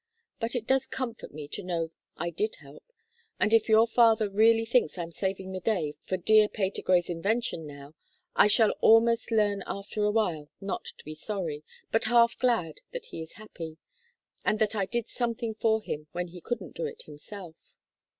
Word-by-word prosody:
But 230 +2 -2
it 235 -2 -2
does 265 +1 +2
comfort 250 -3 -5
me 150 0 -8
to 205 - -5
know 170 -3 -2 0.3
I 170 - -2
did 430 - -1
help, - - -15 0.6
and 215 - +2
if 225 0 +4
your 220 +1 +7
father 225 -3 +4
really 225 +2 +4
thinks 235 -7 +2
I'm 170 -1 -4
saving 190 +1 -3
the 190 - -4
day 175 -7 0
for 185 - -2
dear 215 +3 +5
Patergrey's 185 -3 +1
invention 180 -1 -1
now 140 0 -11 0.4
I - - +6
shall 215 +1 +5
almost 230 +1 +5
learn 210 -3 +2
after 200 +2 -4
a 210 - +3
while 175 -9 0
not 195 0 -4
to - - -14
be 155 - -6
sorry, 155 -3 -4 0.3
but 225 +1 +2
half 235 0 +5
glad 225 -12 0
that - - -5
he - - -6
is 160 - -9
happy, 165 -7 -9 0.7
and 215 - +2
that 220 0 +1
I 195 -3 0
did 235 0 -2
something 235 -2 -2
for 220 0 +1
him 150 -5 -5
when 175 0 -3
he 175 0 -11
couldn't 215 -3 -5
do 170 - -2
it - - -8
himself." 160 +3 -12
210 Hz, 185 wpm, -28 LUFS, 175-225 Hz, 0.7 s, your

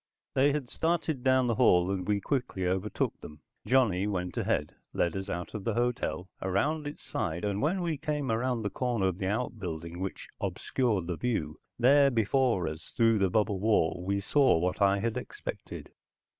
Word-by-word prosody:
They 140 +2 +4
had 140 -3 -2
started 160 -2 -1
down 130 -1 +4
the 120 - +1
hall, 95 -6 +4
and 95 -2 -3
we 105 -1 +2
quickly 120 -5 -2
overtook 95 +3 -1
them. 75 -1 -11 0.3
Johnny 110 -7 +3
went 90 -3 -3
ahead, 75 - -1 0.2
led 85 0 0
us 95 +1 -4
out 90 -1 -4
of 105 -3 -5
the 115 -1 -1
hotel, 120 -8 -1
around 145 +12 0
its 145 - -8
side, 85 +5 -3
and 100 0 -1
when 180 +5 +1
we 160 -4 -2
came 150 -4 -2
around 120 0 0
the 105 - -2
corner 120 -2 0
of 95 0 -1
the 95 - -1
outbuilding 90 -7 -3
which 95 0 -5
obscured 110 -9 0
the 85 -1 -3
view, 80 -11 -2 0.2
there 140 +3 +6
before 115 -5 +2
us, 80 0 -7
through 115 -2 +4
the 95 -1 +3
bubble 105 -1 +1
wall, 95 -5 +2
we 100 +2 0
saw 135 - +3
what 90 +4 -1
I 100 0 +4
had 115 +3 -1
expected. 125 - -7
105 Hz, 185 wpm, -29 LUFS, 90-130 Hz, 0.3 s, there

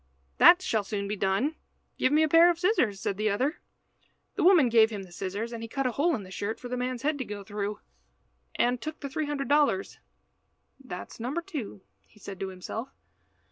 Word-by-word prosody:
"That 355 +1 +8
shall 220 - 0
soon 200 0 -3
be 210 - -2
done. 200 +11 0 0.4
Give 255 - +2
me 305 +1 +4
a - - +3
pair 330 +3 +7
of 345 - +1
scissors," 295 - +1
said 195 - -2
the 215 +1 +1
other. 260 +10 -1 0.7
The - - -2
woman 345 -7 +6
gave 225 -2 +5
him 205 -3 -6
the 185 - -14
scissors, 200 +6 -4
and 230 - -6
he 230 - -7
cut 270 +3 -2
a 255 - +1
hole 315 +6 +1
in 215 - -6
the 185 - -12
shirt 205 +3 -4
for 245 - -8
the 250 - -2
man's 250 0 -3
head 295 0 0
to - - -1
go 205 -3 -7
through, 205 +1 -4 0.8
and 245 0 +1
took 310 0 -6
the 280 - -5
three 300 +3 -2
hundred 280 -2 -3
dollars. 285 -9 +1 0.8
"That 180 -8 -7
is - - -13
number 270 +9 -3
two," 275 - -6 0.4
said 200 -2 -9
he - - -22
to 195 - -3
himself. 190 +6 -6
240 Hz, 220 wpm, -28 LUFS, 205-295 Hz, 0.8 s, That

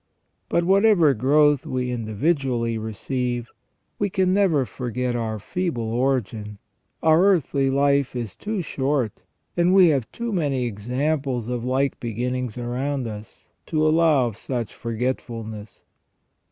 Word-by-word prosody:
But 170 - +2
whatever 190 -4 +5
growth 145 +3 +3
we 125 -1 -2
individually 120 +1 0
receive, 120 +2 -3 0.5
we 205 - +1
can 185 0 +1
never 180 -9 +3
forget 125 0 -3
our 110 -2 -2
feeble 120 - -3
origin; 115 -5 -1 0.5
our 160 +2 +5
earthly 150 -8 +2
life 140 -1 +2
is 120 -5 -4
too 205 -3 -3
short, 135 -6 -1 0.3
and 175 +2 +3
we 185 -3 +7
have 135 -7 0
too 235 -1 -4
many 140 -8 0
examples 125 +3 -2
of 120 -2 -2
like 130 +2 0
beginnings 125 +1 -3
around 125 +3 -2
us, 105 -1 -9 0.2
to 155 -1 +1
allow 155 -4 +4
of 115 -4 -4
such 120 -4 -3
forgetfulness. 115 -3 -4
130 Hz, 125 wpm, -23 LUFS, 115-155 Hz, 0.5 s, we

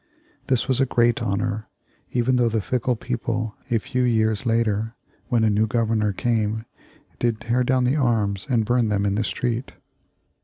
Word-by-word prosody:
This 130 -3 +1
was 130 0 +1
a 135 - +3
great 120 -1 +2
honor, 110 +2 -1 0.4
even 125 +1 +2
though 120 -2 +3
the 110 0 0
fickle 125 +4 0
people, 115 -2 -3
a 120 - +3
few 125 +3 -2
years 110 -2 +1
later, 115 0 0 0.3
when 120 -3 +2
a 110 - +4
new 105 +2 +2
Governor 110 -2 +1
came, 110 +1 -1 0.5
did 115 -2 0
tear 120 +3 +1
down 130 0 +2
the 130 +4 +2
arms 110 -7 0
and 115 -4 +2
burn 120 0 +2
them 100 -1 +1
in 100 - +1
the 105 +2 0
street. 120 +4 -2
115 Hz, 170 wpm, -23 LUFS, 110-125 Hz, 0.5 s, a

